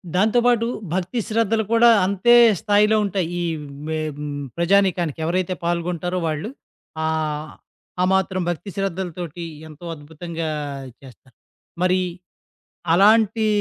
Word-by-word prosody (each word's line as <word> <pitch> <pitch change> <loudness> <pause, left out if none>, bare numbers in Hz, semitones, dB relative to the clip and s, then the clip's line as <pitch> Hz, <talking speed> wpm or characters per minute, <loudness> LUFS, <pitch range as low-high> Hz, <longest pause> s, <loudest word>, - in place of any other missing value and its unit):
దాంతో 215 +6 +3
పాటు 240 -2 +3 0.3
భక్తి 185 +6 -1
శ్రద్ధలు 225 0 +1
కూడా 235 +1 +6 0.2
అంతే 200 +5 +3 0.3
స్థాయిలో 210 +1 +3
ఉంటాయి. 190 -3 -1
ఈ - - -1 0.4
మె 160 0 -2 0.2
హ్మ్, 145 -1 -5 0.2
ప్రజానీకానికి 175 -3 +2
ఎవరైతే 185 +2 0
పాల్గొంటారో 175 +1 -1
వాళ్ళు. 155 +6 -3 0.5
ఆహ్, 155 -1 -2 0.5
ఆ - - +4
మాత్రం 190 -1 +1
భక్తి 175 +3 -4
శ్రద్ధలతోటి 175 -3 -4 0.2
ఎంతో 155 +2 -12
అద్భుతంగా 160 +2 -6 0.5
చేస్తారు. 130 -1 -17 0.5
మరి 185 0 +3 0.9
అలాంటి 215 +4 +4
180 Hz, 110 wpm, -22 LUFS, 160-200 Hz, 0.9 s, కూడా